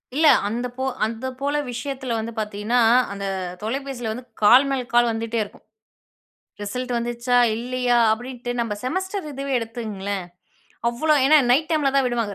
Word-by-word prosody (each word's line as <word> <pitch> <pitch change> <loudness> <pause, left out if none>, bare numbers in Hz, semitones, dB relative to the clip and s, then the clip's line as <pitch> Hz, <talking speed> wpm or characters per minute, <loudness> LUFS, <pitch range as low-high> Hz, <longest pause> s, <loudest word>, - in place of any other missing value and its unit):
இல்ல. 310 +2 +4 0.2
அந்த 240 +4 -2
போ 260 - -2 0.2
அந்த 225 +3 -5
போல 285 +1 -1 0.2
விஷயத்துல 255 0 -4
வந்து 225 +1 -4
பார்த்தீங்கன்னா. 210 +3 -1 0.3
அந்த 200 0 -5 0.4
தொலைபேசியில 245 -1 -3
வந்து 245 +2 -8 0.2
கால் 245 +6 +7
மேல் 270 -2 -1
கால் 240 0 +5
வந்துட்டே 225 +1 -2
இருக்கும். 205 - -14 1.0
ரிசல்ட் 250 +5 -4
வந்துச்சா? 240 +1 0 0.2
இல்லயா? 245 +1 0
அப்டின்ட்டு 245 +1 -4
நம்ம 225 -3 -2
செமஸ்டர் 375 +6 -3
இதுவே 275 0 -5
எடுத்துங்களேன். 210 -4 -4 0.7
அவ்ளோ 305 +7 +2
ஏனா, 305 +3 +7
நைட் 300 +5 +3
டைம்ல 295 -4 +2
தான் 270 -2 +3
விடுவாங்க 230 -4 -1
245 Hz, 145 wpm, -23 LUFS, 225-270 Hz, 1.0 s, கால்